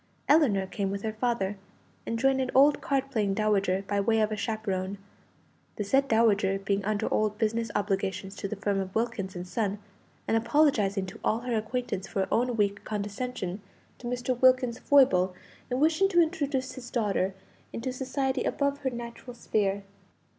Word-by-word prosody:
Ellinor 265 -11 +4
came 195 +1 -3
with 200 0 -4
her 220 -1 -2
father, 215 -4 -1 0.5
and 230 - -1
joined 265 +2 +2
an 260 - -1
old 285 +2 +6
card 275 -1 -1
playing 205 -6 0
dowager, 195 -3 +1
by 205 - 0
way 225 +2 +2
of 215 0 +2
a - - 0
chaperone 200 -3 -2 0.8
the 210 - -2
said 270 +7 +2
dowager 205 -5 +3
being 195 0 -1
under 215 +1 -1
old 215 -1 +1
business 225 0 0
obligations 195 -1 -1
to 200 - -3
the 215 - -4
firm 200 0 -1
of 190 -1 -5
Wilkins 220 -5 -2
and 175 +1 -6
Son, 205 0 -1 0.5
and - - +2
apologizing 225 -6 +2
to 185 - -10
all 225 +2 +1
her 245 -1 -2
acquaintances 220 -3 -3
for 195 - 0
her 190 - 0
own 245 0 +1
weak 205 -1 0
condescension 205 -2 -4 0.4
to 240 - -7
Mr. 250 +1 -1
Wilkins's 255 -2 +4
foible 190 -10 +4 0.3
in 250 0 -1
wishing 320 +6 +3
to 350 -3 +3
introduce 290 -6 0
his 255 -2 -9
daughter 200 -5 0 0.4
into 255 +2 -4
society 265 +1 -1
above 280 0 0
her 270 - -1
natural 240 0 -8
sphere. 200 -4 0
220 Hz, 175 wpm, -28 LUFS, 200-255 Hz, 0.8 s, old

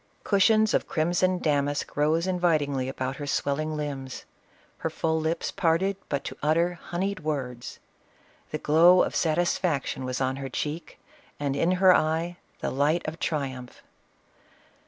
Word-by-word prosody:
Cushions 215 +2 +3
of - - +1
crimson 175 +3 +1
damask 145 -3 -1
rose 155 +3 +2
invitingly 155 -8 +1
about 130 0 -4
her 145 - -5
swelling 150 +3 -1
limbs. 135 -3 -5 0.5
Her - - -2
full 160 0 -1
lips 160 +1 -1
parted 180 +3 +1
but 140 -1 -1
to - - -7
utter 165 +4 +2
honeyed 190 +3 -2
words. 130 -6 -4 0.7
The 155 - -3
glow 170 +5 +5
of - - -3
satisfaction 165 -4 0
was 130 0 -3
on 130 0 0
her 135 -1 -5
cheek, 150 +5 -4 0.4
and 140 -2 -1
in 170 +5 +2
her 185 0 +6
eye 165 +3 0 0.2
the - - -2
light 150 +6 +1
of 160 +1 -5
triumph. 130 -5 -4
155 Hz, 140 wpm, -26 LUFS, 140-175 Hz, 0.7 s, her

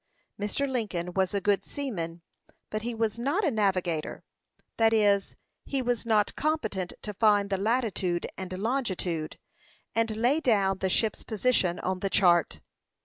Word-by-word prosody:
Mr. 210 +7 -1
Lincoln 200 -9 -2
was 190 -1 +1
a 200 - 0
good 200 0 +1
seaman, 170 -12 -5 0.5
but 215 - -2
he 235 +1 -3
was 225 0 -1
not 290 - +1
a 305 - +2
navigator; 185 -7 -1 0.5
that 225 0 +4
is, 205 -2 +3 0.3
he 275 - -2
was 245 -2 -1
not 215 -2 +2
competent 220 - -1
to 210 - -4
find 205 -1 +3
the 195 - +2
latitude 200 -6 0
and 185 -1 -5
longitude, 190 - -2 0.6
and 225 -1 0
lay 250 +7 +3
down 200 -9 +2
the 190 - 0
ship's 215 +3 0
position 215 -5 +1
on 185 0 -1
the 195 - -1
chart. 175 -4 +3
205 Hz, 150 wpm, -28 LUFS, 185-235 Hz, 0.6 s, that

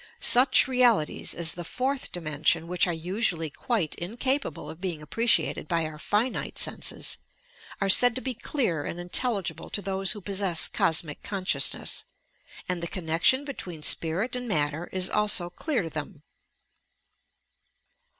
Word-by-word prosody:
Such 255 +4 +5
realities 245 -11 +1
as 170 -1 +2
the 175 - -7
"fourth 260 +9 -3
dimension," 160 0 -1
which 180 +1 +1
are - - 0
usually 170 -1 -1
quite 200 - -2
in 185 +7 -6
capable 270 +3 -1
of 160 - -10
bein^ 180 -4 -4
appreciated 165 0 0
by 165 -1 0
our 155 -1 -8
finite 220 +9 -2
senses, - - +2 0.6
are 195 - 0
said 235 +4 +7
to 260 - -2
be 260 -1 -3
clear 215 - -2
and 170 - -6
intelligible 180 - -2
to - - -2
those 195 0 +1
who 210 - -8
possess 190 -3 +2
Cosmic 160 -2 -1
Consciousness, 195 -2 0 0.6
and 180 -2 -2
the 170 - -3
connection 170 - 0
between 180 - -7
spirit 175 +12 +3
and 250 0 -4
matter 155 -3 -1
is 185 -1 0
also 205 -4 +1
clear 255 - -2
to 165 - -6
them. 150 0 -7
180 Hz, 145 wpm, -26 LUFS, 165-230 Hz, 0.6 s, said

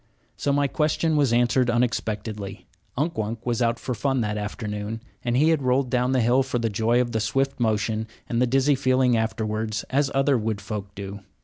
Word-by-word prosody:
So 140 - -1
my 140 0 +2
question 155 +2 +1
was 140 -5 +3
answered 120 +1 +3
unexpectedly. 110 -4 -2 0.3
Unk 155 +2 -1
Wunk 110 +2 -3
was 120 -1 0
out 115 0 +2
for 125 - -3
fun 135 +1 0
that 105 -1 -1
afternoon, 105 0 -4 0.2
and 120 0 +1
had 155 +1 +3
rolled 130 0 +1
down 125 0 +2
the 130 -1 +3
hill 120 +3 +4
for 130 -2 -1
the 115 -2 -1
joy 115 +4 +2
of 120 -1 0
the 110 - 0
swift 135 +5 0
motion 110 -1 0 0.2
and 120 0 0
the 125 - +3
dizzy 135 +3 +3
feeling 130 -2 +3
afterwards, 110 -1 -1
as 140 +1 +2
other 135 -1 +3
wood 110 -1 -2
folk 100 -1 -6
do. 100 0 -6
120 Hz, 195 wpm, -24 LUFS, 110-130 Hz, 0.3 s, hill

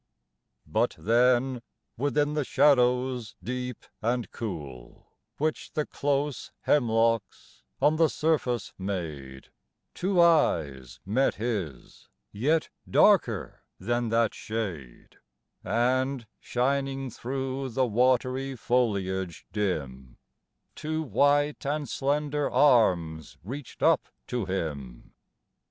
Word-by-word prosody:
But - - 0
then, 125 +3 +2 0.3
within 145 +3 0
the 150 -1 0
shadows 125 -4 +2
deep 125 +2 -5 0.2
and 120 +1 -1
cool 75 - -8 0.3
Which 155 +1 -2
the 150 - 0
close 145 0 -2
hemlocks 115 -5 +1 0.2
on 155 +2 +3
the 165 -1 +4
surface 140 -8 0
made, 75 -9 -5 0.4
Two 185 0 0
eyes 75 - +2
met 120 +8 +1
his 100 - -5 0.2
yet 150 +10 +1 0.2
darker - - +3 0.2
than 120 0 -1
that 115 0 +2
shade 90 - -6 0.5
And, 125 +4 0
shining 135 +1 -1
through 135 +2 -4
the 130 +2 +1
watery 130 +3 +1
foliage 100 -7 -1
dim, 70 - -3 0.6
Two 155 +1 -3
white 145 +1 +2
and 145 +1 -2
slender 145 +2 -1
arms 90 - +2
reached 130 +7 -7
up - - +3 0.2
to 120 - -2
him. 75 -10 -5
125 Hz, 95 wpm, -27 LUFS, 95-140 Hz, 0.6 s, the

